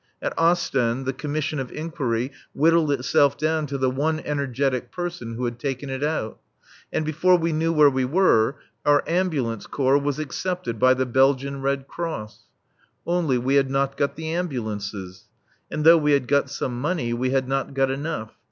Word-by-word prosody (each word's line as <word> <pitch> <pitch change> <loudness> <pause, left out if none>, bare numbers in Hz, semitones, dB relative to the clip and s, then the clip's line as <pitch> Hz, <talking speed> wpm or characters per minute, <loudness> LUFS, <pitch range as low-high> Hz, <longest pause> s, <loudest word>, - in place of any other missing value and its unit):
At - - -3
Ostend 135 -7 +1
the 135 - -1
commission 150 +2 -3
of 130 -2 -5
inquiry 140 -6 -2 0.2
whittled 160 0 +3
itself 140 +1 +2
down 155 0 0
to 140 0 -3
the 130 -1 +1
one 155 +4 0
energetic 140 -3 -1
person 175 -11 -5
who 125 +2 -2
had 120 0 -4
taken 135 +1 -3
it 130 +1 -3
out. 150 -8 -2 0.5
And 155 - -1
before 170 +4 +3
we 165 -1 -1
knew 160 +2 +1
where 150 -2 +6
we 130 -2 +1
were 135 -4 +3 0.3
our 145 0 +4
Ambulance 155 - -1
Corps 135 0 +2
was 140 -1 -2
accepted 155 -3 -3
by 130 +2 +5
the 130 0 0
Belgian 135 +2 +2
Red 135 0 -1
Cross. 160 -11 -6 0.6
Only 170 -7 +1
we 130 +3 0
had 140 -1 +3
not 135 0 0
got 140 - -1
the 160 +1 -5
ambulances. 105 - -4 0.4
And 150 - -3
though 165 0 +8
we 150 -1 +2
had 135 -3 +1
got 140 -1 +2
some 125 -3 -4
money, 145 -6 -1
we 125 +2 -1
had 130 -1 0
not 135 +1 -2
got 135 -1 +2
enough. 135 -5 -4
140 Hz, 180 wpm, -24 LUFS, 130-155 Hz, 0.6 s, though